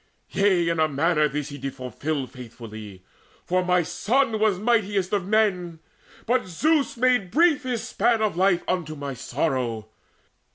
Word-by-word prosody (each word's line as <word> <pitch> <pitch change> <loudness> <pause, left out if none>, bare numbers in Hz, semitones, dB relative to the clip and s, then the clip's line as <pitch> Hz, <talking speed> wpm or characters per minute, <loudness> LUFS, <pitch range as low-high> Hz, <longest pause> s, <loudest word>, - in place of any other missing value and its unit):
Yea, 190 -4 +2
in 165 -1 -1
a 155 - +4
manner 150 +1 +2
this 150 0 -4
did 145 -2 -9
he 135 - -1
fulfil 135 +3 -4
Faithfully; 110 -6 -10 0.4
for 185 +1 +1
my 180 -1 +2
son 230 - 0
was 215 -3 +2
mightiest 205 -3 0
Of 195 -3 0
men. 190 -6 +1 0.5
But 245 -2 +1
Zeus 285 - +1
made 245 -6 +2
brief 315 - +3
his 250 -4 -3
span 230 -2 +1
of 215 - 0
life 180 -1 +2
Unto 165 -4 -2
my 140 -1 -5
sorrow. 125 -4 -2
180 Hz, 155 wpm, -24 LUFS, 145-220 Hz, 0.5 s, a